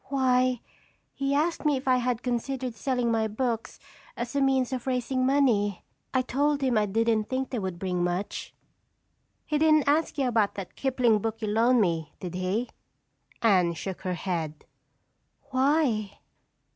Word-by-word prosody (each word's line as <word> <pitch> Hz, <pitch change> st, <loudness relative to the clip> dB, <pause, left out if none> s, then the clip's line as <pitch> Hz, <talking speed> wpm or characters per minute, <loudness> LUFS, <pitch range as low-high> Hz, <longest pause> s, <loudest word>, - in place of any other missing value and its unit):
"Why, 255 Hz, -2 st, +2 dB, 0.5 s
he 275 Hz, 0 st, -1 dB
asked 325 Hz, +4 st, 0 dB
me 295 Hz, -3 st, +2 dB
if 260 Hz, -, -8 dB
I 255 Hz, -1 st, +5 dB
had 245 Hz, -1 st, -1 dB
considered 250 Hz, +1 st, -2 dB
selling 245 Hz, +1 st, -1 dB
my 220 Hz, -1 st, +1 dB
books 230 Hz, +1 st, -3 dB, 0.4 s
as 240 Hz, +3 st, -4 dB
a 280 Hz, -, +2 dB
means 265 Hz, -1 st, +2 dB
of 255 Hz, 0 st, -4 dB
raising 255 Hz, 0 st, 0 dB
money. 230 Hz, -8 st, +2 dB, 0.3 s
I 260 Hz, -1 st, +1 dB
told 285 Hz, +3 st, 0 dB
him 255 Hz, -3 st, +2 dB
I 210 Hz, -1 st, +2 dB
didn't 225 Hz, +1 st, +1 dB
think 260 Hz, 0 st, -2 dB
they 245 Hz, -, -1 dB
would 190 Hz, -3 st, -4 dB
bring 180 Hz, -1 st, -1 dB
much." 175 Hz, +3 st, -3 dB, 0.9 s
"He 300 Hz, -, 0 dB
didn't 310 Hz, -2 st, +4 dB
ask 305 Hz, +2 st, +2 dB
you 270 Hz, -2 st, +1 dB
about 220 Hz, -4 st, +1 dB
that 195 Hz, -3 st, -7 dB
Kipling 250 Hz, -5 st, +2 dB
book 225 Hz, +1 st, -3 dB
you 215 Hz, -2 st, -2 dB
loaned 230 Hz, +3 st, +4 dB
me, 165 Hz, -5 st, -1 dB
did 180 Hz, -2 st, -6 dB
he?" 185 Hz, +7 st, -2 dB, 0.7 s
Anne 185 Hz, -6 st, +4 dB
shook 185 Hz, +3 st, -6 dB
her 185 Hz, -1 st, -2 dB
head. 165 Hz, -4 st, -4 dB, 0.9 s
"Why?" 260 Hz, -6 st, +1 dB
240 Hz, 160 wpm, -27 LUFS, 205-265 Hz, 0.9 s, I